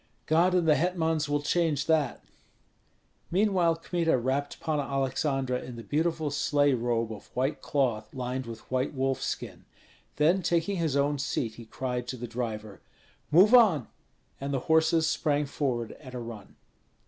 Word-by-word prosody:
"God 170 +4 +3
and 175 -3 +2
the 155 - +7
hetmans 160 -2 0
will 145 0 0
change 155 -3 +1
that." 155 -5 +1 1.1
Meanwhile 185 -3 +2
Kmita 165 -2 0
wrapped 135 +4 -2
Panna 155 -3 -1
Aleksandra 135 -1 -1
in 125 - -8
the 115 - -8
beautiful 160 +5 -1
sleigh 145 0 +2
robe 115 -2 0
of 105 - -11
white 130 +4 -1
cloth 120 -7 -1
lined 125 0 -4
with 115 -1 -7
white 130 +2 -1
wolfskin; 135 0 -2 0.5
then 170 +6 +3
taking 175 +3 0
his 160 -5 0
own 140 0 +1
seat, 115 -4 -2
he 115 +1 -11
cried 125 +1 -4
to 130 - -4
the 120 - -5
driver, 110 -4 -5 0.5
"Move 185 +9 +6
on!" 195 - +5 0.5
and 140 +1 -4
the 135 -2 -1
horses 160 0 +3
sprang 150 -1 +1
forward 130 -5 -2
at 130 -3 -10
a - - -3
run. 115 -4 -9
145 Hz, 155 wpm, -28 LUFS, 125-160 Hz, 1.1 s, the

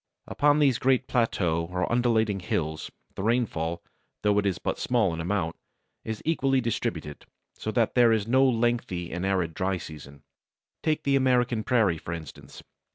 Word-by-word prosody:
Upon 145 0 +2
these 135 -5 +3
great 130 0 +2
plateaux 90 -9 +1
or 90 0 -2
undulating 115 -4 +2
hills 80 -3 -3 0.2
the - - -6
rainfall, 95 -7 -1 0.4
though 105 0 +3
it 100 - 0
is 95 - 0
but - - -3
small 115 -8 +1
in 80 - -4
amount, 85 -2 -1 0.5
is 110 -1 -5
equally 135 -4 +2
distributed, 110 - -3 0.3
so - - -6
that 115 0 +1
there 120 -2 +5
is 110 -3 +1
no 130 +3 +4
lengthy 115 -8 0
and 90 +2 -2
arid 90 -4 0
dry 95 +1 -1
season. 75 -4 -11 0.6
Take 155 -1 0
the 140 -1 +2
American 125 -4 +2
Prairie, 105 -8 +2
for 85 - -6
instance. 80 -3 -10
110 Hz, 160 wpm, -27 LUFS, 85-125 Hz, 0.6 s, there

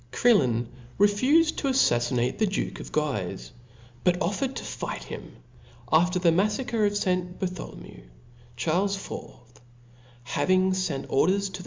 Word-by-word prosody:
Crillon/refufed 205 - +2
to 280 - -1
aflaffinate 120 - +2
the 215 - +3
duke 195 - -3
of - - -9
Guife, 105 -12 -2 0.5
but 180 0 +2
offered 250 +9 -1
to - - -5
fight - - -5
him. - - -9 0.6
After 175 +3 +4
the 175 -2 +4
maflacre 215 +5 +1
of 205 0 -1
St. 180 -2 -1
Bartholomew, 180 - -6 0.5
Charles 180 - 0
IX. 120 -11 -10 0.6
having 185 +9 +2
fent 180 -8 -2
or 135 - +2
ders 195 +1 +1
to - - -14
the. - - -7
180 Hz, 135 wpm, -26 LUFS, 130-205 Hz, 0.6 s, After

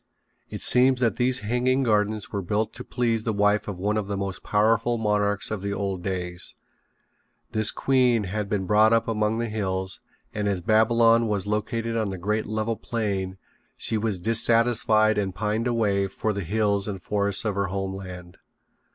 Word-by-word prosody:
It - - -6
seems 130 +1 +5
that 115 -2 +1
these 130 +1 +2
hanging 125 +4 +1
gardens 105 -2 0
were 100 - -2
built 105 +4 -1
to - - -8
please 115 -3 -1
the 110 - -1
wife 105 +1 +1
of 100 -3 -5
one 105 +3 -1
of 105 -2 -2
the 100 -1 -3
most 100 -1 -4
powerful 115 +3 +1
monarchs 105 -2 0
of 110 -3 -3
the 100 0 -3
old 100 -2 -3
days. 90 -1 -3 1.0
This 110 -1 +4
queen 125 -4 +2
had 100 +1 -4
been 100 -3 -1
brought 110 +3 +4
up 115 - +2
among 110 0 0
the 115 0 -2
hills, 95 -3 -2 0.3
and 105 -1 -2
as 100 -2 0
Babylon 115 +3 +3
was 100 -3 -1
located 115 +2 -2
on 110 -3 -1
a 95 - -5
great 105 +5 -2
level 110 +2 -2
plain 100 -5 -3 0.4
she - - -2
was 110 -2 -1
dissatisfied 110 +1 +3
and 95 -3 -3
pined 110 +3 -1
away 105 -5 +1
for 105 +3 -2
the 100 - -3
hills 100 +2 0
and 100 -2 -4
forests 100 +2 0
of 105 - 0
her 100 0 -1
home 95 0 -3
land. 90 -2 -9
105 Hz, 180 wpm, -25 LUFS, 100-115 Hz, 1.0 s, seems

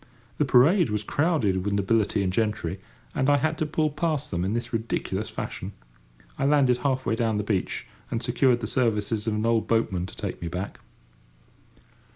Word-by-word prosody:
The 150 - +3
parade 145 - +5
was 105 0 -1
crowded 115 - +1
with 100 0 0
nobility 100 0 +1
and 90 -1 -1
gentry, 100 -4 -1 0.3
and 130 - +1
I 145 - +5
had 155 +3 0
to 155 - 0
pull 155 0 0
past 150 -1 -1
them 90 -2 -1
in 95 +3 -1
this 120 +1 -3
ridiculous 115 0 -2
fashion. - - -5 0.7
I - - +1
landed 140 -4 +4
half 130 0 -1
way 115 - +1
down 115 -2 0
the 105 - -1
beach, 100 -3 -1 0.2
and 115 +1 -2
secured 120 0 +2
the - - -2
services 110 -2 0
of 110 - +1
an 105 +1 -1
old 115 -1 +2
boatman 100 -6 +1
to - - -11
take - - -5
me 85 - -3
back. 90 +4 -5
115 Hz, 190 wpm, -26 LUFS, 105-135 Hz, 0.7 s, parade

